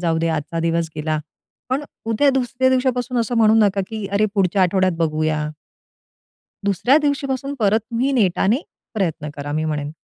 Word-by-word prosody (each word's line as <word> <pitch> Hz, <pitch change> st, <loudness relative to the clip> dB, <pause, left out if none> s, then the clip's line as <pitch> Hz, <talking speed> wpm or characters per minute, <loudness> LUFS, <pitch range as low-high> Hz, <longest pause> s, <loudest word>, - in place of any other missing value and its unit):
जाऊ 165 Hz, -2 st, +1 dB
दे 165 Hz, -, 0 dB
आजचा 160 Hz, +1 st, -2 dB
दिवस 165 Hz, 0 st, 0 dB
गेला. 155 Hz, 0 st, -1 dB, 0.5 s
पण, 265 Hz, +3 st, 0 dB, 0.2 s
उद्या 250 Hz, +6 st, +3 dB
दुसऱ्या 260 Hz, 0 st, +1 dB
दिवसापासून 250 Hz, -1 st, 0 dB
असं 235 Hz, +1 st, -1 dB
म्हणू 220 Hz, -1 st, +5 dB
नका 205 Hz, -3 st, +3 dB
की 215 Hz, -3 st, -5 dB
अरे 205 Hz, +1 st, +3 dB
पुढच्या 190 Hz, -1 st, +2 dB
आठवड्यात 185 Hz, 0 st, +2 dB
बघूया. 155 Hz, -1 st, 0 dB, 1.2 s
दुसऱ्या 200 Hz, -, +3 dB
दिवशी 285 Hz, -1 st, 0 dB
पासून 275 Hz, +1 st, -3 dB
परत 215 Hz, +1 st, +3 dB
तुम्ही 250 Hz, +4 st, 0 dB
नेटाने 205 Hz, -1 st, +2 dB, 0.4 s
प्रयत्न 165 Hz, -7 st, -2 dB
करा, 145 Hz, 0 st, -5 dB
मी 155 Hz, +1 st, -1 dB
म्हणेन. 150 Hz, -2 st, -2 dB
200 Hz, 160 wpm, -21 LUFS, 165-245 Hz, 1.2 s, म्हणू